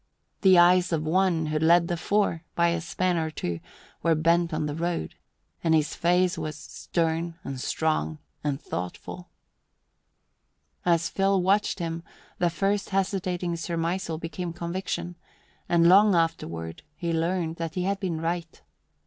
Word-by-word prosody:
The 190 Hz, -2 st, +6 dB
eyes 180 Hz, +1 st, +5 dB
of 160 Hz, -2 st, 0 dB
one, 170 Hz, 0 st, +2 dB
who 155 Hz, 0 st, -1 dB
led 170 Hz, +2 st, +5 dB
the 175 Hz, -, -1 dB
four 180 Hz, -1 st, 0 dB
by 170 Hz, 0 st, +3 dB
a 170 Hz, 0 st, -1 dB
span 180 Hz, +1 st, 0 dB
or 160 Hz, -1 st, 0 dB
two, 85 Hz, -, -4 dB, 0.4 s
were 165 Hz, -1 st, +3 dB
bent 170 Hz, +2 st, +2 dB
on 155 Hz, -1 st, -1 dB
the 150 Hz, -, -2 dB
road, 170 Hz, -, -2 dB, 0.5 s
and 160 Hz, -1 st, +4 dB
his 155 Hz, -1 st, +1 dB
face 180 Hz, +1 st, +2 dB
was 155 Hz, -1 st, -4 dB
stern 165 Hz, +1 st, -2 dB
and 135 Hz, -2 st, -5 dB
strong 100 Hz, -, 0 dB, 0.3 s
and 145 Hz, -2 st, -1 dB
thoughtful. 90 Hz, -, -6 dB, 1.6 s
As 170 Hz, -1 st, +3 dB
Phil 195 Hz, 0 st, +2 dB
watched 195 Hz, +3 st, +2 dB
him, 165 Hz, -2 st, -3 dB, 0.4 s
the 175 Hz, -, +3 dB
first 195 Hz, +4 st, 0 dB
hesitating 185 Hz, -2 st, -1 dB
surmisal 165 Hz, 0 st, -2 dB
became 170 Hz, +1 st, -5 dB
conviction, 175 Hz, 0 st, -4 dB, 0.5 s
and 170 Hz, -1 st, +5 dB
long 200 Hz, +2 st, +7 dB
afterward 85 Hz, -, -2 dB
he 170 Hz, 0 st, -2 dB
learned 165 Hz, 0 st, -1 dB
that 165 Hz, -1 st, -4 dB
he 180 Hz, -, -1 dB
had 195 Hz, +1 st, 0 dB
been 180 Hz, -5 st, -2 dB
right. 165 Hz, 0 st, -3 dB
170 Hz, 150 wpm, -26 LUFS, 160-180 Hz, 1.6 s, long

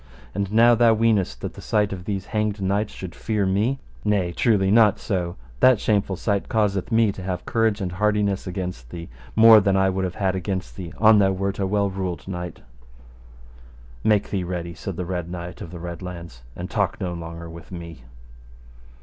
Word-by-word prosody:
And 100 Hz, 0 st, -2 dB
now 115 Hz, +2 st, +6 dB
thou 115 Hz, -1 st, +5 dB
weenest 110 Hz, -4 st, +1 dB
that -, -, -4 dB
the -, -, -11 dB
sight 105 Hz, -2 st, +1 dB
of 90 Hz, -2 st, -7 dB
these 100 Hz, -2 st, -3 dB
hanged 105 Hz, -1 st, 0 dB
knights 100 Hz, +2 st, 0 dB
should 90 Hz, -3 st, -8 dB
fear 105 Hz, 0 st, -1 dB
me. 105 Hz, +8 st, +1 dB, 0.3 s
Nay 100 Hz, -4 st, +1 dB
truly, 95 Hz, -1 st, +2 dB
not 105 Hz, -2 st, +5 dB
so; 90 Hz, -4 st, -2 dB, 0.2 s
that 130 Hz, -4 st, +6 dB
shameful 100 Hz, -3 st, +1 dB
sight 100 Hz, +2 st, -1 dB
causeth 105 Hz, -2 st, 0 dB
me 110 Hz, -2 st, +4 dB
to 95 Hz, -, -9 dB
have 90 Hz, -1 st, -4 dB
courage 115 Hz, -2 st, +1 dB
and 90 Hz, -2 st, -2 dB
hardiness 100 Hz, 0 st, 0 dB
against 90 Hz, -10 st, -5 dB
thee, 85 Hz, +4 st, -8 dB, 0.3 s
more 110 Hz, 0 st, +9 dB
than 100 Hz, -1 st, +2 dB
I 95 Hz, 0 st, +3 dB
would 95 Hz, 0 st, -2 dB
have 90 Hz, -1 st, -3 dB
had 95 Hz, -2 st, 0 dB
against 95 Hz, -9 st, -3 dB
thee 85 Hz, +1 st, -7 dB
an 110 Hz, -1 st, +7 dB
thou 95 Hz, -1 st, +4 dB
wert 95 Hz, +1 st, -2 dB
a 95 Hz, -, +1 dB
well 100 Hz, 0 st, +1 dB
ruled 95 Hz, -2 st, -4 dB
knight. 90 Hz, -2 st, -6 dB, 1.4 s
Make 105 Hz, -2 st, +2 dB
thee 95 Hz, -3 st, -1 dB
ready, 85 Hz, -1 st, -4 dB
said 95 Hz, +2 st, -6 dB
the 90 Hz, -, -4 dB
Red 90 Hz, -1 st, -3 dB
Knight 85 Hz, 0 st, -7 dB
of -, -, -7 dB
the 90 Hz, -, -8 dB
Red 85 Hz, 0 st, -6 dB
Launds, 85 Hz, -8 st, -8 dB
and 90 Hz, -, -5 dB
talk 100 Hz, -2 st, -1 dB
no 90 Hz, -3 st, -3 dB
longer 85 Hz, 0 st, -7 dB
with 85 Hz, +1 st, -11 dB
me. 85 Hz, -5 st, -8 dB
95 Hz, 195 wpm, -23 LUFS, 90-105 Hz, 1.4 s, more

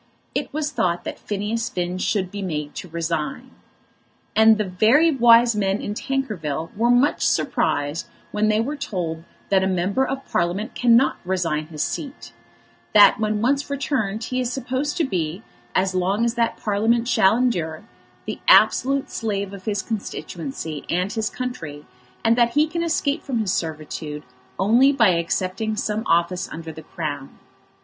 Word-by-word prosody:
It -, -, -2 dB
was 300 Hz, 0 st, -2 dB
thought 175 Hz, -, 0 dB
that -, -, -6 dB
Phineas 215 Hz, +3 st, -2 dB
Finn 180 Hz, -1 st, -3 dB
should 185 Hz, -2 st, -1 dB
be 205 Hz, -, -5 dB
made 150 Hz, -5 st, -4 dB
to 180 Hz, -, -7 dB
resign. 165 Hz, +9 st, -3 dB, 0.8 s
And 220 Hz, 0 st, +6 dB
very 220 Hz, -, +3 dB
wise 235 Hz, -3 st, +5 dB
men 195 Hz, -1 st, 0 dB
in 205 Hz, -, -4 dB
Tankerville 190 Hz, -, -3 dB
were 230 Hz, +3 st, +2 dB
much 245 Hz, +4 st, +3 dB
surprised 145 Hz, +3 st, 0 dB, 0.2 s
when 210 Hz, +1 st, +1 dB
they 215 Hz, 0 st, +2 dB
were 270 Hz, +7 st, -1 dB
told 180 Hz, -, -4 dB, 0.3 s
that 190 Hz, -1 st, +3 dB
a -, -, +1 dB
member 190 Hz, +7 st, +1 dB
of 270 Hz, 0 st, -3 dB
Parliament 185 Hz, +7 st, -1 dB
cannot 240 Hz, +2 st, +4 dB
resign 170 Hz, -5 st, -1 dB
his 155 Hz, -2 st, -3 dB
seat, 285 Hz, -1 st, -6 dB, 0.6 s
that 210 Hz, +1 st, +7 dB
when 215 Hz, 0 st, 0 dB
once 275 Hz, +3 st, +1 dB
returned 255 Hz, -7 st, -1 dB
he 255 Hz, +3 st, -2 dB
is 245 Hz, -1 st, -2 dB
supposed 265 Hz, +4 st, -2 dB
to 335 Hz, -, +2 dB
be, 180 Hz, -, -2 dB, 0.3 s
as 190 Hz, 0 st, +2 dB
long 190 Hz, +5 st, +1 dB
as 235 Hz, -, 0 dB
that 235 Hz, -1 st, 0 dB
Parliament 225 Hz, +3 st, +1 dB
shall 220 Hz, -3 st, +4 dB
endure, 175 Hz, -10 st, -1 dB, 0.4 s
the -, -, -5 dB
absolute 275 Hz, -, +4 dB
slave 200 Hz, -3 st, -3 dB
of 195 Hz, -1 st, -10 dB
his 205 Hz, -3 st, -1 dB
constituency 165 Hz, -, -5 dB
and 180 Hz, +3 st, 0 dB
his 220 Hz, -2 st, -1 dB
country, 165 Hz, -13 st, -6 dB, 0.4 s
and 225 Hz, +1 st, +5 dB
that 235 Hz, -1 st, +3 dB
he 295 Hz, +1 st, +4 dB
can 335 Hz, +2 st, -3 dB
escape 315 Hz, -4 st, 0 dB
from 260 Hz, -4 st, -3 dB
his 210 Hz, -4 st, 0 dB
servitude 155 Hz, -2 st, -4 dB, 0.3 s
only 235 Hz, +8 st, +5 dB
by 235 Hz, -7 st, +4 dB
accepting 185 Hz, +5 st, -1 dB
some 210 Hz, 0 st, -2 dB
office 170 Hz, +2 st, +1 dB
under 165 Hz, 0 st, -7 dB
the 160 Hz, -, -9 dB
Crown. 145 Hz, -3 st, -6 dB
210 Hz, 160 wpm, -22 LUFS, 175-245 Hz, 0.8 s, that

